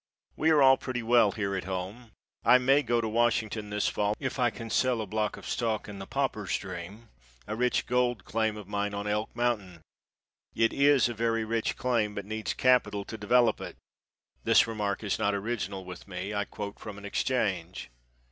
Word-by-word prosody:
We 160 - +2
are 150 -3 +5
all 135 0 +7
pretty 125 -2 -4
well 115 -3 +4
here 100 -2 -2
at 90 - -3
home. 95 +6 -5 0.3
I 125 - +7
may 135 +3 +4
go 120 -3 +1
to 110 - -2
Washington 110 -2 0
this 105 0 0
fall 105 0 0
if 135 0 -3
I 120 -1 +4
can 115 0 -8
sell 125 0 +2
a 110 - -2
block 105 +1 -2
of - - -11
stock 115 -3 -1
in 100 -2 -8
the 95 - -7
Pauper's 125 -8 -1
Dream, 95 +4 -8 0.4
a 110 - -4
rich 125 +2 +1
gold 125 -5 0
claim 110 -1 0
of 105 -3 -9
mine 100 0 -2
on 100 0 -4
Elk 105 +1 -1
mountain. 105 -8 -1 0.7
It 115 0 +2
is 140 -2 +4
a 120 - -4
very 115 0 0
rich 115 0 -1
claim, 115 -5 0
but 100 - -4
needs 110 +1 -3
capital 125 -6 +2
to - - -7
develop 115 +2 +3
it. - - -7 0.7
(This - - +5
remark 105 -2 -2
is 105 - -1
not 100 -2 +1
original 100 -3 -3
with 90 +1 -9
me. 95 +2 -5
I 105 -1 -1
quote 100 0 -7
from 105 -2 -8
an 100 - -10
exchange.) 95 - -1
110 Hz, 195 wpm, -29 LUFS, 100-120 Hz, 0.7 s, all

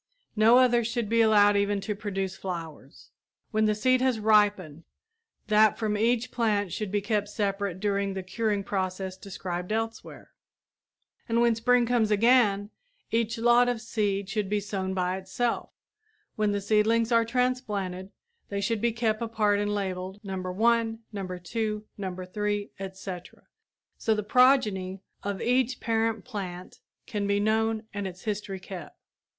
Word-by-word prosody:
No 225 +3 +6
others 240 -3 +4
should 230 -2 -2
be 230 0 +3
allowed 205 -2 +5
even 200 0 +1
to 210 +2 -2
produce 195 -2 -3
flowers. 165 -7 -8 0.4
When 215 -1 +2
the 215 0 +2
seed 255 +4 +2
has 255 -3 +2
ripened, 205 -7 +2 0.6
that 215 0 +4
from 215 -2 -1
each 235 +3 +1
plant 205 -6 0
should 210 -3 -3
be 205 0 +1
kept 205 0 -1
separate 200 -3 -2
during 200 -1 -1
the 190 - -4
curing 205 +1 -1
process 190 -1 -3
described 185 -1 -5
elsewhere. 225 +1 -4 1.0
And 230 +1 +2
when 235 -1 +4
spring 240 +2 +3
comes 235 -2 +2
again, 210 -2 +3 0.4
each 230 0 0
lot 240 +1 +4
of 245 -2 -1
seed 205 -4 -1
should 200 0 -2
be 210 0 +1
sown 190 -2 -3
by 180 0 0
itself. 190 +6 -2 0.7
When 210 -1 +1
the 205 0 -1
seedlings 220 +3 +2
are 230 -1 +5
transplanted, 215 -7 -2 0.4
they 200 - -2
should 205 +2 -1
be 235 -1 +1
kept 225 -1 0
apart 215 -3 +1
and 205 0 -1
labeled 190 -1 -3
No. 195 -1 -5
1, 225 +5 +1 0.2
No. 195 -2 -4
2, 210 +4 -3
No. 185 -2 -4
3, 205 +1 -2
etc., 190 -2 -8 0.6
so 220 - +1
the 210 - -2
progeny 210 -6 +3 0.2
of 200 -1 -3
each 250 0 +1
parent 225 -2 0
plant 185 -7 -7 0.3
can 205 -2 -2
be 200 0 +2
known 220 +1 +1
and 200 -1 -3
its 180 -1 -10
history 205 -3 -3
kept. 185 -1 -9
210 Hz, 155 wpm, -27 LUFS, 195-225 Hz, 1.0 s, No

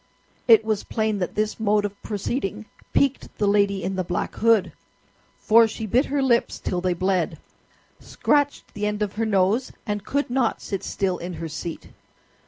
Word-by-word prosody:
It 225 -2 +7
was 215 -2 0
plain 215 -2 -1
that 180 - -3
this 215 +1 -1
mode 210 -1 +2
of 200 0 -6
proceeding 215 0 -3 0.3
piqued 280 -1 0
the 210 - +1
lady 200 -1 +2
in 190 0 -2
the 185 - 0
black 175 0 -3
hood, 225 -4 +3 0.7
for 230 0 +5
she 220 0 -5
bit 245 +7 +2
her 280 0 0
lips 240 -3 +2
till 180 -1 -2
they 180 -1 0
bled, 180 -3 0 0.6
scratched 290 -1 0
the 205 0 -2
end 210 0 -1
of 200 - -3
her 225 +1 -1
nose, 205 +5 +2
and 210 -3 -3
could 280 +3 -1
not 250 -3 +1
sit 195 -3 -4
still 185 -2 -1
in 175 +1 -5
her 165 -1 -5
seat. 160 +1 -6
210 Hz, 180 wpm, -24 LUFS, 190-225 Hz, 0.7 s, It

